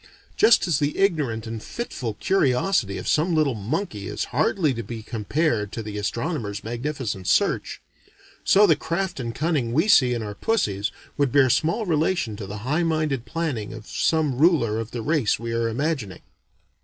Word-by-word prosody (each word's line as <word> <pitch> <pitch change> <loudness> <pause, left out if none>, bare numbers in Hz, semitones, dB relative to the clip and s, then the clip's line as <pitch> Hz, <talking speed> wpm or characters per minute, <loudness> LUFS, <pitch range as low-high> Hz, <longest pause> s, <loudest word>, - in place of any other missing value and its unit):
Just 225 -4 +5
as 160 -5 +2
the 145 0 -1
ignorant 150 - +1
and 115 -1 -5
fitful 125 - -5
curiosity 130 - +1
of - - -6
some 165 +3 +2
little 150 -4 +2
monkey 105 - -3
is - - -3
hardly 155 +2 +2
to 115 - -4
be 115 0 -7
compared 110 -1 -1
to 115 - -4
the 105 -1 -5
astronomer's 110 - -3
magnificent 120 -5 -4
search, - - +1 0.6
so 205 +2 +6
the 165 -6 +5
craft 170 +1 -3
and 115 -2 -4
cunning 145 -7 0
we 160 - +2
see 125 - +5
in 115 - -3
our 105 -1 -5
pussies 105 - -1 0.3
would 140 -3 +1
bear 135 -2 +5
small 165 - +1
relation 160 - 0
to 100 -2 -7
the 105 +2 -6
high 150 +6 +1
minded 155 -6 0
planning 145 -11 -3
of 110 -1 -9
some 150 -4 0
ruler 145 -10 +3
of 115 0 -4
the 120 -2 -5
race 145 -7 +1
we 115 +1 -5
are 115 0 0
imagining. 125 - -3
130 Hz, 175 wpm, -24 LUFS, 110-160 Hz, 0.6 s, so